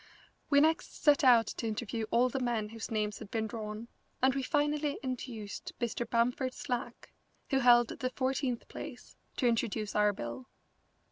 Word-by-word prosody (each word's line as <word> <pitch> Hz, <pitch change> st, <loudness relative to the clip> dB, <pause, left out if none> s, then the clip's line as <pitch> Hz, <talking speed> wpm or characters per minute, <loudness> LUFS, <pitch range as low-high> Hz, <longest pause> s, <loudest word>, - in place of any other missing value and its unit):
We 285 Hz, -1 st, +6 dB
next 320 Hz, +1 st, 0 dB
set 295 Hz, -1 st, +5 dB
out 240 Hz, -3 st, +7 dB
to 230 Hz, -, -4 dB
interview 220 Hz, 0 st, -3 dB
all 245 Hz, +2 st, +4 dB
the 260 Hz, +2 st, -2 dB
men 235 Hz, -4 st, -1 dB
whose 225 Hz, 0 st, -6 dB
names 210 Hz, -2 st, -1 dB
had -, -, -9 dB
been 220 Hz, 0 st, -1 dB
drawn, 215 Hz, +1 st, -6 dB, 0.3 s
and 260 Hz, +1 st, +4 dB
we 275 Hz, -, -1 dB
finally 295 Hz, +1 st, 0 dB
induced 240 Hz, -5 st, -5 dB
Mr. 240 Hz, 0 st, -2 dB
Bamford 250 Hz, +2 st, +1 dB
Slack, 245 Hz, -2 st, -4 dB, 0.4 s
who 270 Hz, -, +3 dB
held 240 Hz, -2 st, +6 dB
the 255 Hz, -, -3 dB
fourteenth 260 Hz, -2 st, -1 dB
place, -, -, -9 dB, 0.2 s
to 255 Hz, -, 0 dB
introduce 225 Hz, -2 st, 0 dB
our 210 Hz, 0 st, +4 dB
bill. 120 Hz, -7 st, -6 dB
240 Hz, 160 wpm, -32 LUFS, 220-260 Hz, 0.4 s, out